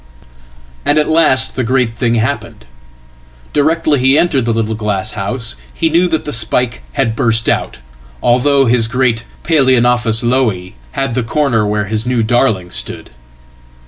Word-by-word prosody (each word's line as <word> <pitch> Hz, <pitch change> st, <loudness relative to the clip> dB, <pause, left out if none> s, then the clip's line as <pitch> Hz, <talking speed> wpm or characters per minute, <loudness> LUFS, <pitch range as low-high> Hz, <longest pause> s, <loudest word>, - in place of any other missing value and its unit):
And 145 Hz, -, +1 dB
at 150 Hz, -, +2 dB
last 155 Hz, -5 st, +3 dB
the 130 Hz, -, -1 dB
great 125 Hz, -1 st, 0 dB
thing 120 Hz, 0 st, 0 dB
happened. 110 Hz, -, -3 dB, 0.9 s
Directly 155 Hz, -1 st, +1 dB
he 135 Hz, +3 st, +3 dB
entered 140 Hz, -8 st, +1 dB
the 115 Hz, -, 0 dB
little 110 Hz, -1 st, -1 dB
glasshouse 105 Hz, +2 st, -3 dB, 0.2 s
he 165 Hz, -1 st, -1 dB
knew 175 Hz, +3 st, +3 dB
that 160 Hz, -3 st, -2 dB
the 150 Hz, -, -4 dB
spike 120 Hz, +1 st, 0 dB
had 125 Hz, -5 st, -1 dB
burst 115 Hz, -2 st, +2 dB
out, -, -, -1 dB, 0.5 s
although 135 Hz, +3 st, +3 dB
his 115 Hz, -1 st, +2 dB
great_Paloeonophis 125 Hz, -1 st, +1 dB
Lowii_ 115 Hz, -7 st, 0 dB, 0.2 s
hid 135 Hz, -3 st, -2 dB
the 125 Hz, -, 0 dB
corner 115 Hz, -3 st, 0 dB
where 105 Hz, 0 st, -1 dB
his 110 Hz, +3 st, -2 dB
new 125 Hz, -2 st, +1 dB
darling 110 Hz, -6 st, 0 dB
stood. -, -, -5 dB
120 Hz, 145 wpm, -14 LUFS, 115-135 Hz, 0.9 s, last